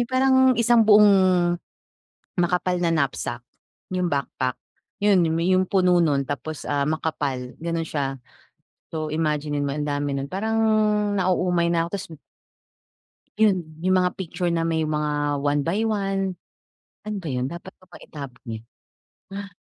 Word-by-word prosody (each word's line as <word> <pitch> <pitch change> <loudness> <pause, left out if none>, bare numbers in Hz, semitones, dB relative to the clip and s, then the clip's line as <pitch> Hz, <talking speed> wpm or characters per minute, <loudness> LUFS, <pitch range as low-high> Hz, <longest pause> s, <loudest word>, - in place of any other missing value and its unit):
yon 240 - -1
parang 260 +1 +3 0.2
isang 235 0 +4
buong 210 0 +8 1.3
makapal 180 +1 +1
na 175 - +1
knapsack, 125 -4 -2 0.5
'yong 180 -1 0
backpack. 140 -3 -2 0.5
'Yon, 205 -3 +5 0.2
'yong 185 0 +2
puno 180 -2 +3
no'n 145 -4 +2
tapos, 145 +2 -5
ah, 145 0 0
makapal 145 -5 -2
gano'n 165 0 -2
siya. 135 -2 -2 0.7
So, 155 -1 -4
imagine-in 150 -2 -1
mo 140 0 -2
ang 150 - -2
dami 145 -1 -1
no'n 135 - -3
parang 220 +8 -2 0.6
nauumay 180 -3 +1
na 165 -1 +1
ako - - -7
tapos 200 -2 -4 1.3
'Yon. 185 -8 +1
Yung 185 0 +3
mga 180 0 +1
picture 175 -1 -2
na 165 -1 0
may 160 -1 0
mga 150 -1 -1
1x1 195 +5 0 0.7
Ano 215 - -3
ba - - -5
'yon 125 0 -1
dapat 175 +2 -9
ko 185 - -21
ba 175 - -12
itapon 140 -5 -10 0.7
'yon? 200 0 -9
170 Hz, 140 wpm, -24 LUFS, 145-185 Hz, 1.3 s, buong